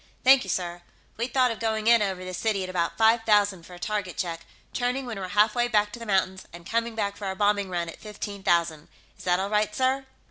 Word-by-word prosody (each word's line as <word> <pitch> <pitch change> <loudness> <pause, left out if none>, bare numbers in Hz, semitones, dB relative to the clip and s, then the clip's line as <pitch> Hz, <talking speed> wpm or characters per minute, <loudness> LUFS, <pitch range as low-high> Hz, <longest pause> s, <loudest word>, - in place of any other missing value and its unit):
"Thank 265 0 +7
you, 190 - -8
sir. 175 -1 -2 0.3
We'd 235 +3 -3
thought 255 -2 +3
of 225 - -6
going 220 -1 -1
in 235 -1 +6
over 190 -2 -2
the 185 - -6
city 200 +1 0
at 185 - -5
about 170 -2 -1
five 225 +1 +4
thousand 205 -5 +2
for 180 - -11
a - - -13
target 205 -1 -3
check, 170 -4 -4 0.3
turning 250 +2 -1
when 230 -5 -5
we're 185 - -4
half 210 +3 +3
way 240 -1 +1
back 210 -2 +2
to 235 - -7
the 230 - -8
mountains, 190 -1 0
and 170 0 -12
coming 230 +2 -1
back 200 -2 -1
for 205 - -6
our 190 -1 -2
bombing 205 -1 +1
run 175 -2 -2
at 165 - -10
fifteen 205 -1 -7
thousand. 170 -4 +1 0.3
Is - - -14
that 180 0 +2
all 195 +2 -2
right, 210 0 +1
sir?" 265 +1 0
205 Hz, 250 wpm, -26 LUFS, 185-225 Hz, 0.3 s, Thank